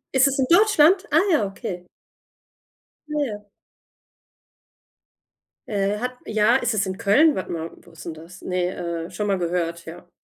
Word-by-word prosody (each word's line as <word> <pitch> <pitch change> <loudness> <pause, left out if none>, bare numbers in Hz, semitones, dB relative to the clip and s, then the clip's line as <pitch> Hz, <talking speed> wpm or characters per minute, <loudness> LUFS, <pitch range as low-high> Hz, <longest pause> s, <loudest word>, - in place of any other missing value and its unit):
Ist 265 +1 +5
es 275 +1 -2
in 260 - +2
Deutschland? 375 -1 +5
Ah 315 - +6
ja, 215 -10 +2
okay. 195 -3 -7 1.2
Ah, - - -8
ja. 210 -3 -7 2.2
Äh, 205 -1 -1
hat 250 +3 -3
ja, 215 -1 +3
ist 240 -1 0
es 205 -2 0
in 190 0 -4
Köln? 265 +9 +4
Warte 190 - -4
mal, 165 0 -4
wo - - -19
ist 165 - -12
denn 165 - -6
das? 165 +4 -13
Ne, 175 -2 -3
äh, - - -13
schon 205 +4 -3
mal 195 -2 +1
gehört, 170 -1 -2
ja. 175 +2 -11
200 Hz, 165 wpm, -23 LUFS, 175-250 Hz, 2.2 s, Ah